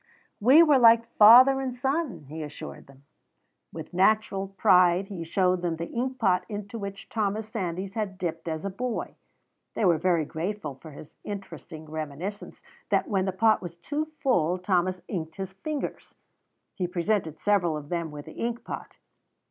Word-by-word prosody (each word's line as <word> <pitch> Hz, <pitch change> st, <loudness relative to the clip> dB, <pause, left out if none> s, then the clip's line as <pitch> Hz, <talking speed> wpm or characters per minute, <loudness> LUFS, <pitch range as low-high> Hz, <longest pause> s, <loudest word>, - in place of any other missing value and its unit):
"We 265 Hz, +10 st, +7 dB
were 295 Hz, -5 st, +5 dB
like 230 Hz, -1 st, +6 dB
father 255 Hz, +5 st, +8 dB
and 255 Hz, -2 st, -3 dB
son," 270 Hz, -, -2 dB
he 155 Hz, +3 st, -7 dB
assured 150 Hz, -1 st, -9 dB
them. 140 Hz, 0 st, -19 dB, 0.7 s
With -, -, -9 dB
natural 195 Hz, +1 st, +2 dB
pride 185 Hz, -1 st, +3 dB
he 180 Hz, -5 st, -5 dB
showed 180 Hz, +1 st, +1 dB
them 175 Hz, -2 st, -1 dB
the 165 Hz, +1 st, -6 dB
ink 255 Hz, +2 st, -2 dB
pot 190 Hz, -7 st, +2 dB
into 205 Hz, +1 st, -6 dB
which 200 Hz, -1 st, -7 dB
Thomas 215 Hz, 0 st, -2 dB
Sandys 190 Hz, -3 st, -4 dB
had 205 Hz, -4 st, -3 dB
dipped 165 Hz, -2 st, -4 dB
as 160 Hz, +2 st, -3 dB
a 200 Hz, -, -2 dB
boy. 240 Hz, +4 st, -4 dB, 0.6 s
They 220 Hz, -, +1 dB
were 170 Hz, -4 st, +4 dB
very 170 Hz, -2 st, +1 dB
grateful 165 Hz, 0 st, -4 dB
for 135 Hz, +5 st, -13 dB
his 150 Hz, 0 st, -12 dB
interesting 170 Hz, -5 st, -8 dB
reminiscence 155 Hz, +6 st, -6 dB, 0.3 s
that -, -, +1 dB
when 190 Hz, -3 st, +1 dB
the 190 Hz, -, 0 dB
pot 215 Hz, +4 st, +3 dB
was 175 Hz, -2 st, -7 dB
too 290 Hz, -, -3 dB
full 180 Hz, -, +1 dB
Thomas 185 Hz, -1 st, 0 dB
inked 160 Hz, -4 st, -5 dB
his 190 Hz, -1 st, -6 dB
fingers. 290 Hz, +9 st, -5 dB, 0.6 s
He 180 Hz, -3 st, -2 dB
presented 175 Hz, -3 st, -1 dB
several 180 Hz, -6 st, +1 dB
of 145 Hz, -1 st, -9 dB
them 170 Hz, -2 st, -2 dB
with 150 Hz, -1 st, -9 dB
the -, -, -10 dB
ink 235 Hz, +1 st, -3 dB
pot. -, -, -8 dB
190 Hz, 170 wpm, -27 LUFS, 170-220 Hz, 0.7 s, father